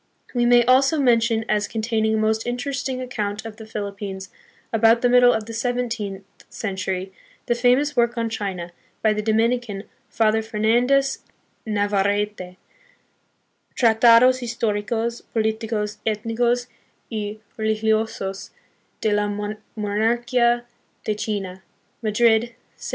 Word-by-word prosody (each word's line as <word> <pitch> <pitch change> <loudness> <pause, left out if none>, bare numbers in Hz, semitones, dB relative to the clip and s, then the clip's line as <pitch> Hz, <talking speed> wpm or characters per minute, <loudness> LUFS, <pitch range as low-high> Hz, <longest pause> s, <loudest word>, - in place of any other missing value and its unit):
We 240 -1 +2
may 240 0 +5
also 270 +5 +4
mention 230 -3 +2
as 210 -1 +1
containing 220 -1 0
a - - +1
most 220 +1 0
interesting 260 +1 -3
account 215 -4 -4
of 220 -1 -8
the 220 -2 -10
Philippines 200 -3 -6 0.4
about 225 +1 +4
the 245 - +4
middle 245 0 +6
of 220 -3 -1
the 230 - -8
seven 245 +2 -1
teenth 200 -4 -5 0.3
century, 190 -2 -4 0.3
the - - +2
famous 250 +4 +2
work 240 0 +2
on 230 0 0
China, 195 -6 -4 0.3
by 215 -1 +4
the 210 - -2
Domini 225 +3 +2
can, 205 -5 -7 0.3
Father 220 0 +2
Fernandez 240 +5 +2 0.5
Navarrete, 205 -2 -1 1.2
Tratados 235 +2 +5
historicos, 230 0 -2
politi 220 0 0
cos, 210 -2 -2
ethnicos, 230 +3 0 0.5
y 210 -1 -4 0.2
religiosos 220 -2 -1 0.5
de 215 - +1
la 205 0 +1
Monarchia 220 +4 0 0.4
de 215 - +1
China, 200 -3 -4 0.4
Madrid, 220 +1 +3
1767. 235 - -26
220 Hz, 125 wpm, -22 LUFS, 210-240 Hz, 1.2 s, middle